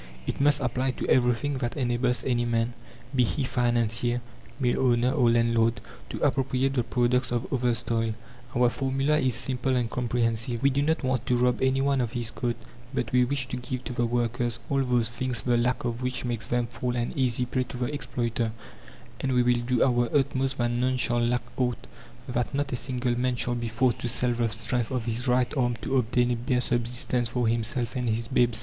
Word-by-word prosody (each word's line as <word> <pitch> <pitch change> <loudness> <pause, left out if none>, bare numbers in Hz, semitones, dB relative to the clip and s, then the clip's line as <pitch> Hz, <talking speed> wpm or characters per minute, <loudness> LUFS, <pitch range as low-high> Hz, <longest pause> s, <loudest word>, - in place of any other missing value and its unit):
It - - -3
must 145 0 +4
apply 130 +1 0
to - - -3
everything 130 +2 +2
that 120 +2 -3
enables 125 -1 +1
any 120 -2 +1
man 115 0 0 0.4
be 125 - +4
he 135 +4 -1
financier, 120 -1 +1 0.4
mill 125 -3 +1
owner, 120 0 +3
or 120 -2 +3
landlord 115 -1 +2 0.3
to - - -5
appropriate 135 0 +1
the 130 - +2
product 125 +1 +1
of 120 0 -1
others' 120 -2 +1
toil. 115 -1 0 0.4
Our 125 0 +4
formula 135 +4 +1
is 130 -4 +1
simple 130 +1 -1
and 120 -2 0
comprehensive. 120 -1 -1
We 140 - +5
do 140 +2 +1
not 160 +1 +1
want 130 -2 -1
to 125 - +3
rob 125 0 +2
any 130 0 +2
one 140 -1 +2
of 115 -2 -2
his 120 -3 -2
coat, 120 -2 -2 0.4
but 135 - -2
we 125 0 +4
wish 135 +1 0
to 125 - -3
give 125 0 -5
to 125 - -5
the 120 -1 0
workers 120 0 -1
all 135 -1 +2
those 125 -3 +2
things 120 0 -2
the 120 -1 +2
lack 120 +2 +1
of 120 0 -2
which 125 0 -2
makes 120 -3 -3
them 120 0 +1
fall 120 +1 -3
an 120 0 -2
easy 125 -2 +1
prey 130 +1 -1
to 125 - -7
the 125 +3 -2
exploiter, 120 -4 -2 0.7
and 135 - -1
we 125 -1 +4
will 120 0 +2
do 125 0 +2
our 120 -2 +2
utmost 135 -1 0
that 120 -1 +1
none 125 +2 +1
shall 120 -1 +1
lack 120 +1 +1
aught, 125 -2 -1 0.4
that 125 +2 -2
not 140 0 -1
a - - 0
single 125 -1 -1
man 125 0 +1
shall 120 0 0
be 120 -1 -2
forced 120 +2 +1
to - - -2
sell 120 +1 +1
the 120 -1 0
strength 115 +2 -2
of 125 -4 -2
his 120 +2 -2
right 125 +1 +2
arm 120 -3 +1
to 135 - +1
obtain 125 0 +2
a - - +1
bare 125 +2 0
subsistence 120 0 0
for 120 -1 0
himself 115 +2 -1
and 125 -2 -1
his 115 +1 -1
babes. 120 -3 +2
125 Hz, 210 wpm, -27 LUFS, 120-130 Hz, 0.7 s, We